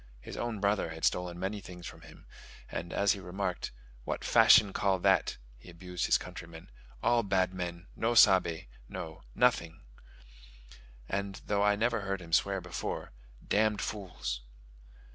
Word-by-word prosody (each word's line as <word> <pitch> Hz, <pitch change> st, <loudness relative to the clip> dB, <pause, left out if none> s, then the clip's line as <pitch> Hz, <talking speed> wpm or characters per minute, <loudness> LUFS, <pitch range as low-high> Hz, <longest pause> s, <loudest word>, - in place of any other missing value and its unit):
His -, -, -9 dB
own 120 Hz, -3 st, -3 dB
brother 100 Hz, -3 st, +1 dB
had 80 Hz, 0 st, -3 dB
stolen 90 Hz, -1 st, 0 dB
many 100 Hz, +2 st, -3 dB
things 90 Hz, -2 st, -10 dB
from -, -, -9 dB
him; -, -, -15 dB, 0.5 s
and 85 Hz, +1 st, -4 dB
as 100 Hz, -1 st, +3 dB
he 100 Hz, -, -1 dB
remarked, 95 Hz, 0 st, -3 dB, 0.3 s
"What -, -, -3 dB
fashion 100 Hz, -2 st, +6 dB
call 95 Hz, -2 st, +2 dB
that:" 95 Hz, -2 st, +2 dB, 0.2 s
he 75 Hz, -, -14 dB
abused 90 Hz, +1 st, -4 dB
his -, -, +5 dB
countrymen, 80 Hz, -1 st, -10 dB, 0.3 s
"all 120 Hz, 0 st, +4 dB
bad 95 Hz, -3 st, +1 dB
men, 90 Hz, -1 st, -5 dB
no 120 Hz, +1 st, 0 dB
sabe 90 Hz, -6 st, +5 dB, 0.2 s
(know) 80 Hz, -1 st, -7 dB
nothing" 85 Hz, -1 st, +2 dB, 1.3 s
and, 100 Hz, 0 st, -3 dB
though 100 Hz, -1 st, +1 dB
I 105 Hz, 0 st, +4 dB
never 115 Hz, +1 st, +1 dB
heard 95 Hz, 0 st, -2 dB
him 85 Hz, -2 st, -10 dB
swear 100 Hz, +3 st, +3 dB
before, 90 Hz, 0 st, -5 dB, 0.4 s
"damned 105 Hz, -1 st, +2 dB
fools." 90 Hz, -, -4 dB
95 Hz, 150 wpm, -31 LUFS, 85-100 Hz, 1.3 s, fashion